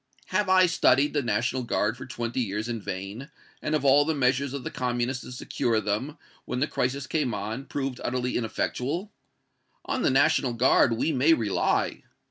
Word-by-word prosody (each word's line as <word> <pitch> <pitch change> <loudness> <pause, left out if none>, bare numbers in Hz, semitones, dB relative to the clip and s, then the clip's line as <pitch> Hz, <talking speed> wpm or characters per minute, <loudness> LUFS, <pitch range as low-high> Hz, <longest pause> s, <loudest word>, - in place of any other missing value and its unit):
Have 185 +1 +1
I 185 0 +6
studied 150 -4 +3
the 145 - +1
National 120 +2 0
Guard 115 -2 0
for - - -9
twenty 120 +1 -3
years 105 0 -2
in 115 -2 -3
vain, 100 - -6 0.3
and 155 - 0
have 150 - -1
all 140 +2 +6
the 160 +1 -1
measures 130 0 +1
of 140 -2 -5
the - - -5
Communists 125 0 -2
to - - -9
secure 120 -2 -1
them, 110 +9 -2 0.3
when 125 - -3
the 140 - +2
crisis 135 -1 -2
came 130 -4 -1
on, 110 +6 -4
proved 135 -2 -4
utterly 125 0 -1
ineffectual? 130 - -2 0.7
On 270 -2 -2
the - - +3
National 130 -1 +3
Guard 120 0 +4
we 120 +8 0
may 145 +3 +4
rely. 110 -7 0
125 Hz, 180 wpm, -26 LUFS, 115-140 Hz, 0.7 s, I